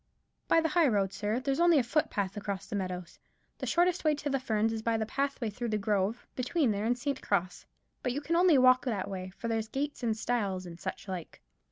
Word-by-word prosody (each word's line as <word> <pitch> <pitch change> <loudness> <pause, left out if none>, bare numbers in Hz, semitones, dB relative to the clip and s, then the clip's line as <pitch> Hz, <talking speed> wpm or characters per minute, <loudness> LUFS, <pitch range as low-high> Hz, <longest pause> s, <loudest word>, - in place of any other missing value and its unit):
"By 330 - +5
the 320 - 0
high 340 -2 +4
road, 200 -5 +1
sir; 215 +3 -1
there's 270 +2 -1
only 345 -2 +6
a 265 - +4
footpath 215 -7 0
across 200 -2 -4
the 220 - -5
meadows. 185 -3 -4 0.4
The - - -4
shortest 350 +1 +2
way 305 -1 +3
to 290 0 -3
the 270 - +1
Ferns 225 -2 0
is 220 - -3
the 225 -1 0
pathway 275 -4 -1
through 235 +3 -4
the 215 - +1
grove 205 +2 0
between 255 -1 +1
here 205 +1 -2
and 245 +2 +1
St. 270 +2 -2
Cross; 185 -2 -1 0.3
but 250 - -1
you 265 - -2
can 320 +3 -1
only 345 -3 +6
walk 255 0 +6
that 215 -7 -1
way, 185 -1 -5
for 195 +5 -7
there's 225 -1 -1
gates 285 +5 -3
and 225 -3 0
stiles, 205 -6 -1
and 170 -1 -9
such - - -6
like." 180 -4 -6
230 Hz, 225 wpm, -30 LUFS, 200-275 Hz, 0.4 s, only